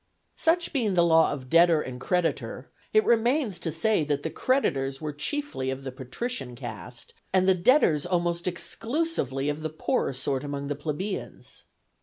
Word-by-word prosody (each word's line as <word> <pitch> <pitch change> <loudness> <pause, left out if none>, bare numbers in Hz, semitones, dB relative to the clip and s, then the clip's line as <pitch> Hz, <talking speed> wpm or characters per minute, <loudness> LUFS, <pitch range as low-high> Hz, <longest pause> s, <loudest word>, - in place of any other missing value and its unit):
Such 335 +1 +2
being 225 -9 +1
the 170 -1 +5
law 160 -1 +5
of 130 -3 -6
debtor 165 +2 +5
and 125 -4 -6
creditor, 180 0 -1 0.2
it 435 -1 +4
remains 235 - +2
to 165 - -2
say 185 +3 +2
that 145 -1 -1
the 160 - -3
creditors 135 - 0
were 150 -1 -4
chiefly 150 - -2
of 130 +1 -4
the 130 - -5
patrician 130 - -5
caste, 120 -1 -8 0.2
and 185 0 +3
the 190 - +6
debtors 175 - +3
almost 175 -1 0
exclusively 180 - -1
of 150 +1 -2
the 155 - -2
poorer 155 -2 -1
sort 130 +1 -1
among 140 -1 -4
the 145 - -1
plebeians. 160 +7 -5
165 Hz, 165 wpm, -27 LUFS, 140-220 Hz, 0.2 s, the